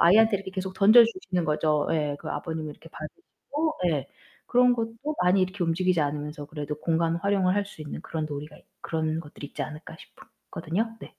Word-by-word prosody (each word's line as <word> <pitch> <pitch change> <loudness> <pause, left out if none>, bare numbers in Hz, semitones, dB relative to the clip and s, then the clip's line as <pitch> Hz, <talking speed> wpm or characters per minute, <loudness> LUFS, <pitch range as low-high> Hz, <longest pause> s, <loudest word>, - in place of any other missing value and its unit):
아이한테 215 +5 +6
이렇게 190 -1 -8
계속 190 -1 -4
던져 215 +5 +8
주시는 205 - -2
거죠. 150 -1 +1
예, 150 -3 0
그 - - -6
아버님이 155 0 -4
이렇게 160 +2 -13
봐 - - -12 0.2
주시고 315 -3 -4
예 145 -5 0 0.4
그런 250 0 +5
것도 225 -1 -2 0.3
많이 185 +2 +4
이렇게 185 0 -1
움직이지 175 +1 +2
않으면서 150 0 -3
그래도 150 -1 -5
공간 165 0 +1
활용을 190 0 +2
할 205 - +2
수 180 -6 -10
있는 150 - -6
그런 160 -2 -3
놀이가 150 0 -7
있 - - -20 0.2
그런 160 -1 -1
것들이 150 -2 -8
있지 - - -9
않을까 155 +1 -8
싶었거든요. 225 +7 -5
네. - - -10
165 Hz, 435 characters per minute, -27 LUFS, 155-200 Hz, 0.4 s, 던져